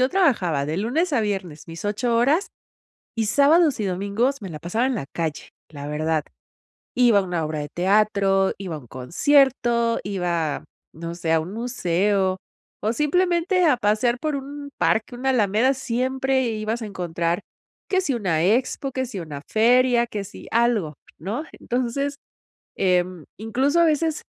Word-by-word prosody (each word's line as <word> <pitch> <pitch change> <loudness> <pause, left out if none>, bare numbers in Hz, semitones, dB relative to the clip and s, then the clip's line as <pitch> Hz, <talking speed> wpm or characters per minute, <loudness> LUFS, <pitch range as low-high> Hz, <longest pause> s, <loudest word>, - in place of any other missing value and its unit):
yo 255 - +4
trabajaba 185 - +1
de 155 +2 -2
lunes 300 - 0
a 255 - +3
viernes 185 -8 -4
mis 165 +3 -8
8 230 +3 0
horas 290 - +2 0.7
y 225 -1 0
sábados 290 +1 +4
y - - 0
domingos 200 +8 -1
me 195 - -6
la 155 -3 -8
pasaba 220 +9 0
en 265 - 0
la 165 -11 -4
calle, 160 -3 -3 0.2
la 145 -2 -7
verdad. 155 +1 0 0.7
Iba 240 -4 +5
a 200 - +2
una 175 -3 -2
obra 155 0 -3
de 145 - -5
teatro, 195 +2 +2
iba 180 -5 -5
a - - -6
un 125 - -14
concierto, 235 - +2
iba, 175 -6 -2 0.3
no 165 +1 -6
sé, 165 -1 -1
a 160 - +4
un 175 +4 -7
museo 195 -4 0 0.5
o 215 - +2
simplemente 350 - +2
a 290 -6 +4
pasear 235 +3 +1
por 305 0 -2
un 285 +1 -7
parque, 225 +3 +1
una 265 +2 -1
alameda, 230 +2 +3
siempre 260 +1 0
ibas 220 +2 -3
a - - -4
encontrar 175 -2 -2 0.5
que 375 -1 +2
si 320 - 0
una 180 -8 0
expo, 250 +7 +1
que 260 +1 -2
si 230 -6 -6
una 150 -4 -7
feria, 240 +2 +4
que 210 -4 -5
si 200 - -11
algo, 225 -9 +1 0.2
¿no? 210 - -4
Entonces, 255 +4 -2 0.6
em, 180 -3 0
incluso 260 - +1
a 340 - +6
veces 315 0 +1
220 Hz, 165 wpm, -23 LUFS, 180-260 Hz, 0.7 s, a